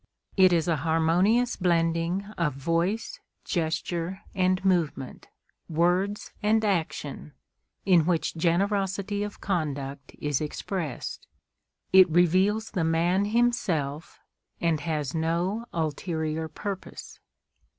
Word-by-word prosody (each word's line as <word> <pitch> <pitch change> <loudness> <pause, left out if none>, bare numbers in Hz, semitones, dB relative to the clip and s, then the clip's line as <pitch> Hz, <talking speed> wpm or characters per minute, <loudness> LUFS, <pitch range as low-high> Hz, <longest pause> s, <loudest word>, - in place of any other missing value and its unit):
It 185 -2 +6
is 170 -2 +2
a 165 -2 +2
harmonious 170 +10 +2
blending 170 +1 +1
of 150 -6 0
voice, 170 +10 -1 0.3
gesture 170 +1 -2
and 185 0 +1
movement, 165 -8 0 0.4
words 180 +5 +1
and 220 +1 +2
action, 155 -6 -2 0.5
in 175 -4 +4
which 170 -2 0
generosity 195 +4 0
of 205 0 -5
conduct 140 -6 -3
is 145 -2 -1
expressed. 155 -1 -4 0.7
It 185 -1 +8
reveals 185 +6 +3
the 180 - -1
man 170 +4 +2
himself 185 -10 0 0.4
and 165 -2 +1
has 150 -3 -2
no 170 +8 -1
ulterior 160 0 -2
purpose. 190 +4 -7
170 Hz, 100 wpm, -27 LUFS, 160-195 Hz, 0.7 s, It